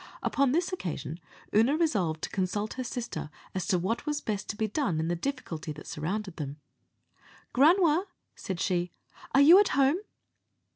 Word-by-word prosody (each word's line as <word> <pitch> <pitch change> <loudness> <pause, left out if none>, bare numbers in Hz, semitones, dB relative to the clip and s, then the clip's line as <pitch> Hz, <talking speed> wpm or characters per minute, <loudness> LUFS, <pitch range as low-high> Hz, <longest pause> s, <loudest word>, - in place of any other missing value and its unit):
Upon 275 -2 +2
this 345 +5 0
occasion 160 - -4 0.3
Oonagh 245 +9 +4
resolved 185 - 0
to - - -3
consult 200 +3 -1
her 255 - -4
sister 240 -9 -5 0.2
as 190 - -3
to 190 - +3
what 225 - -2
was 295 -1 0
best 210 -7 -4
to 215 - -2
be 220 +1 0
done 210 - -1
in 160 +1 -1
the 175 - +1
difficulty 170 - -4
that 150 - -11
surrounded 185 +4 -4
them. 145 -1 -5 0.9
"Granua," 330 +5 +5 0.3
said 190 -5 -5
she, 175 -1 0 0.5
"are 275 - +7
you 335 +7 +9
at 410 - +5
home?" 275 +4 +4
215 Hz, 165 wpm, -29 LUFS, 175-280 Hz, 0.9 s, you